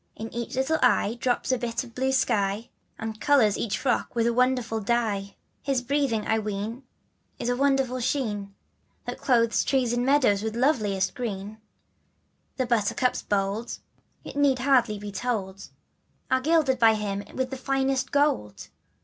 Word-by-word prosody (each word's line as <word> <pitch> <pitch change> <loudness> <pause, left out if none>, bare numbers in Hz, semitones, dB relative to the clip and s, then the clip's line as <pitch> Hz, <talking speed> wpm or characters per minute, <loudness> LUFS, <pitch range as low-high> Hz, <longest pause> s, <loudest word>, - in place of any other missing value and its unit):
*in 225 +1 -7
eaclVlittle 265 +6 -1
eye 235 -3 +3
drops 250 +1 0
a 255 - +1
bit 235 +1 -2
of 235 -2 -13
blue 265 +2 0
sky, 220 -5 0 0.3
And 220 0 -6
colors 245 -8 +4
each 215 - -2
frock 245 -3 -1
with 230 -1 +2
a 235 - +2
wonderful 250 -2 +1
c 205 - -9
^V 210 -4 -1 0.3
His 265 -2 -1
breathing 255 -5 0
I 220 0 +1
ween 215 +3 -4 0.6
is 240 - -3
the 245 - +1
wonderful 270 -1 +1
sheen, 230 -5 -1
^V^ - - -23 0.5
That - - -5
clothes 230 -3 +3
trees 255 -3 +1
and 240 0 0
meadows 255 -7 +3
with 220 0 -3
loveliest 210 -8 +1
green, 215 -3 -5 1.0
The 260 - 0
buttercups 235 +1 +1
bold, 205 +3 -2 0.5
it - - -9
need 285 -2 +3
hardly 250 -4 +2
be 205 0 -7
told, 195 -3 -3 0.6
Are 260 0 +3
gilded 290 -3 +2
by 225 -2 +6
him 205 -1 -3
with 260 0 -2
the - - -3
finest 270 0 0
of - - -24
gold. 280 - 0
240 Hz, 165 wpm, -26 LUFS, 210-260 Hz, 1.0 s, by